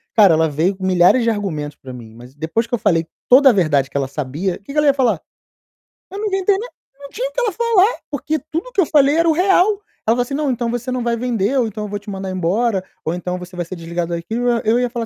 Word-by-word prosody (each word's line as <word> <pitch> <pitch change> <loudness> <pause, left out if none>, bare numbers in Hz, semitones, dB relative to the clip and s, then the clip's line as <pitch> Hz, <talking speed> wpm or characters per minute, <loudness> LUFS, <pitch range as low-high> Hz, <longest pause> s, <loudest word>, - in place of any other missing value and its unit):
Cara, 200 -6 +7
ela 160 0 +2
veio 160 +7 0
com 190 0 -6
milhares 185 +6 +4
de 230 - +2
argumentos 160 -9 -3
pra 130 - -11
mim, 115 -3 -11
mas 120 +2 -13
depois 160 +10 -2
que 240 - -14
eu 240 - +1
falei 165 -6 +1 0.2
toda 270 +2 +7
a 245 - +4
verdade 145 -8 +1
que - - -4
ela 135 -1 -1
sabia, 150 +7 -3
que 200 +8 -11
que 300 - -6
ela 300 -1 +3
ia 280 - +6
falar? 240 - +1 0.9
Eu 390 - -7
não 425 - -3
inventei 385 0 +1
nada, 465 +5 -7 0.3
não 280 0 -10
tinha - - -3
o - - -20
que - - -3
ela 475 -3 +1
falar, 455 0 +2
porque 305 +2 -2
tudo 330 - -5
que 415 - +2
eu - - +2
falei 285 -1 +4
era 335 0 +3
o - - +5
real. 365 +2 +4 0.4
Ela 225 - +4
falou 245 - +1
assim: 245 +3 -4
"Não, 295 0 0
então 240 -2 -1
você 245 +1 -4
não 255 -1 -2
vai 235 -1 0
vender 240 +1 0
ou 240 - +1
então 215 0 -6
eu - - -7
vou 205 0 -4
te 205 - -12
mandar 190 -1 -5
embora, 190 +3 0 0.2
ou 160 - -1
então, 180 +1 -4
você 180 0 -10
vai 175 -1 -3
ser 185 - -7
desligado 170 0 -4
daqui", 170 +5 -6 0.3
eu 225 +3 +2
ia 245 0 0
falar 235 -1 -4
220 Hz, 275 wpm, -19 LUFS, 175-280 Hz, 0.9 s, Cara